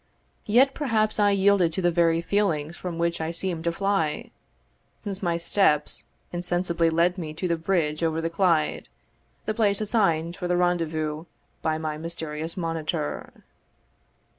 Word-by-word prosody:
Yet 255 Hz, +6 st, +5 dB
perhaps 220 Hz, -7 st, 0 dB
I 205 Hz, -1 st, +5 dB
yielded 200 Hz, -3 st, +4 dB
to 190 Hz, -, -1 dB
the 175 Hz, -, +4 dB
very 165 Hz, -1 st, +3 dB
feelings 170 Hz, -5 st, 0 dB
from 175 Hz, -2 st, -5 dB
which 170 Hz, 0 st, 0 dB
I 160 Hz, -, -2 dB
seemed 170 Hz, 0 st, -3 dB
to 170 Hz, -, +2 dB
fly, 180 Hz, -4 st, -1 dB, 0.7 s
since 195 Hz, -2 st, -6 dB
my 170 Hz, -3 st, 0 dB
steps 165 Hz, -3 st, +1 dB, 0.3 s
insensibly 175 Hz, -1 st, +1 dB
led 170 Hz, +3 st, +2 dB
me 155 Hz, -2 st, -5 dB
to 180 Hz, -, -2 dB
the 170 Hz, -, +1 dB
bridge 165 Hz, -3 st, 0 dB
over 165 Hz, -1 st, +1 dB
the 165 Hz, -, -1 dB
Clyde, 165 Hz, -3 st, +1 dB, 0.6 s
the 215 Hz, -, -1 dB
place 205 Hz, -3 st, +2 dB
assigned 175 Hz, -7 st, +1 dB
for 180 Hz, -, -3 dB
the 175 Hz, 0 st, +1 dB
rendezvous 160 Hz, -3 st, 0 dB, 0.4 s
by 155 Hz, 0 st, 0 dB
my 155 Hz, -1 st, -4 dB
mysterious 160 Hz, 0 st, -4 dB
monitor. 165 Hz, -2 st, -3 dB
170 Hz, 150 wpm, -25 LUFS, 160-195 Hz, 0.7 s, Yet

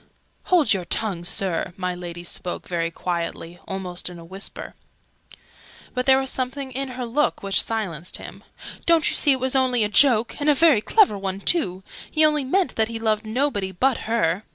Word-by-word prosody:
"Hold 345 Hz, -9 st, +4 dB
your 185 Hz, -3 st, -3 dB
tongue, 185 Hz, -2 st, -1 dB
Sir!" 180 Hz, -1 st, -1 dB
My 180 Hz, -1 st, -2 dB
Lady 175 Hz, -1 st, -7 dB
spoke 175 Hz, 0 st, -5 dB
very 165 Hz, -2 st, -1 dB
quietly 170 Hz, 0 st, -4 dB
almost 185 Hz, -2 st, -4 dB
in 175 Hz, -, -10 dB
a 165 Hz, -, -11 dB
whisper. 190 Hz, +4 st, -7 dB, 1.2 s
But 250 Hz, 0 st, -2 dB
there 265 Hz, 0 st, +7 dB
was 265 Hz, 0 st, -1 dB
something 265 Hz, +1 st, -4 dB
in 270 Hz, +2 st, -3 dB
her 250 Hz, -, -3 dB
look 265 Hz, +2 st, 0 dB
which 195 Hz, -1 st, +3 dB
silenced 185 Hz, -8 st, -3 dB
him. -, -, -11 dB, 0.4 s
"Don't 335 Hz, -2 st, +4 dB
you -, -, -3 dB
see 290 Hz, -, +5 dB
it 260 Hz, -, -2 dB
was 260 Hz, +1 st, -1 dB
only 255 Hz, -3 st, +3 dB
a 210 Hz, -, 0 dB
joke? 230 Hz, 0 st, +4 dB
And 295 Hz, -, +2 dB
a 295 Hz, -, +5 dB
very 300 Hz, -7 st, +5 dB
clever 375 Hz, -, +3 dB
one, 195 Hz, 0 st, -3 dB
too! 190 Hz, -, 0 dB, 0.3 s
He 310 Hz, 0 st, +3 dB
only 300 Hz, -2 st, +2 dB
meant 365 Hz, +8 st, 0 dB
that 220 Hz, -1 st, +2 dB
he 230 Hz, 0 st, -5 dB
loved 220 Hz, -1 st, -1 dB
nobody 215 Hz, -5 st, -1 dB
but 255 Hz, +7 st, +1 dB
her! 195 Hz, -5 st, +1 dB
220 Hz, 190 wpm, -23 LUFS, 180-265 Hz, 1.2 s, there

